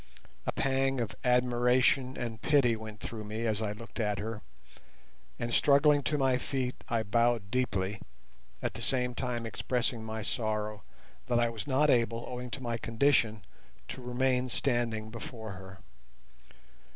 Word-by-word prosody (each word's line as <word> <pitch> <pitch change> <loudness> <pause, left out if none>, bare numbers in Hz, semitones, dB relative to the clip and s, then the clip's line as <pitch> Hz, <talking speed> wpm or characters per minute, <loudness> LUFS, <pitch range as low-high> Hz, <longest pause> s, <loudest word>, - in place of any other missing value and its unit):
A - - +2
pang 135 0 +1
of 115 -3 -2
admiration 125 +1 +3
and 115 -2 -4
pity 140 -6 +4
went 110 -1 -9
through 110 -2 -5
me 110 +2 -4
as 110 -1 0
I 105 -2 -1
looked 115 +3 -10
at 105 -2 +1
her, 110 0 -4 1.0
and 120 0 -3
struggling 145 +2 +5
to 150 +2 0
my 130 -2 +2
feet 130 -1 -3
I 115 -1 +1
bowed 115 -1 +1
deeply, 105 -5 0 0.6
at - - -1
the - - -7
same 125 -2 +1
time 120 -2 -2
expressing 115 +2 -1
my 110 0 -4
sorrow 110 -1 -2 0.5
that 120 - +2
I 120 0 +3
was 115 +4 -6
not 145 +2 +4
able, 115 -1 +2
owing 125 0 -5
to 130 +2 -5
my 120 -1 -1
condition, 115 -4 +2 0.4
to 130 - -6
remain 125 +1 +1
standing 115 -4 -1
before 115 -1 -7
her. 95 0 -10
120 Hz, 150 wpm, -31 LUFS, 110-125 Hz, 1.0 s, struggling